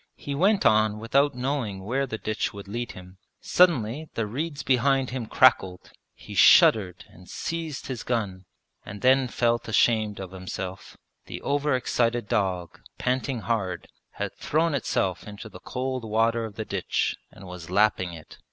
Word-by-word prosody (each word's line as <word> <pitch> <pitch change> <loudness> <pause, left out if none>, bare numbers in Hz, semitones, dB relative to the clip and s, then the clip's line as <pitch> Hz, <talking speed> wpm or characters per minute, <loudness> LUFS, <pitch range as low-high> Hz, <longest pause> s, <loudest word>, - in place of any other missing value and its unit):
He 145 - -6
went 195 +7 +2
on 110 -1 +4
without 140 +6 +1
knowing 125 -7 -3
where 135 +5 -1
the 110 - -4
ditch 110 -1 -2
would 100 -1 -9
lead 120 +4 -4
him. 90 +1 -13 0.2
Suddenly 155 -4 +2
the 115 - -1
reeds 145 +7 -4
behind 135 0 +2
him 125 -3 -4
crackled. 95 -9 +3 0.2
He - - -11
shuddered 95 -5 +5
and 90 +1 -17
seized 165 -4 -4
his 130 -4 -5
gun, 100 -6 -3 0.4
and 105 0 -9
then 130 0 +4
felt 120 -1 0
ashamed 110 -1 +2
of 95 -1 -7
himself: 95 0 -7 0.3
the - - -6
over 145 0 +1
excited 120 -3 0
dog, 90 -5 -2 0.2
panting 130 -1 -1
hard, 100 -6 -2 0.3
had - - -4
thrown 160 +1 0
itself 95 -10 -1
into 105 +1 -9
the 105 - -12
cold 130 -1 -4
water 115 +1 +1
of 105 -2 -9
the 110 - -4
ditch 100 -4 -1
and 95 - -14
was 90 -2 -9
lapping 95 -2 +2
it! 80 -2 -12
115 Hz, 160 wpm, -26 LUFS, 100-130 Hz, 0.4 s, shuddered